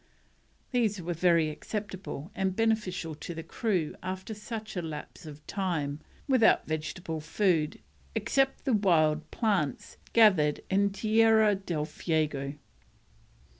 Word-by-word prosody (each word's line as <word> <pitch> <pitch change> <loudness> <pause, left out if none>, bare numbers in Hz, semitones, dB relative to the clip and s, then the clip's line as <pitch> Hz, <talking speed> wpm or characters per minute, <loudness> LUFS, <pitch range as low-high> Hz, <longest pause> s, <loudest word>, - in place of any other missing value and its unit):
These 225 -6 +1
were 175 0 -3
very 170 -2 +3
acceptable 195 -3 -6
and 190 -1 -1
beneficial 210 -7 0
to 165 +3 -7
the 165 - -5
crew 180 -3 -1
after 185 +3 -5
such 215 0 -7
a 180 - -1
lapse 160 +1 -7
of 150 0 -11
time 160 -7 -2 0.3
without 255 -5 +4
vegetable 160 +2 -4
food 165 -1 +1 0.4
except 270 0 +1
the 265 - +2
wild 155 -6 +3
plants 195 - -1 0.2
gathered 185 -10 +5
in 200 +1 +3
Tierra 220 +1 +4
del 175 -6 -2
Fuego. 150 -3 -1
180 Hz, 120 wpm, -29 LUFS, 155-210 Hz, 0.4 s, gathered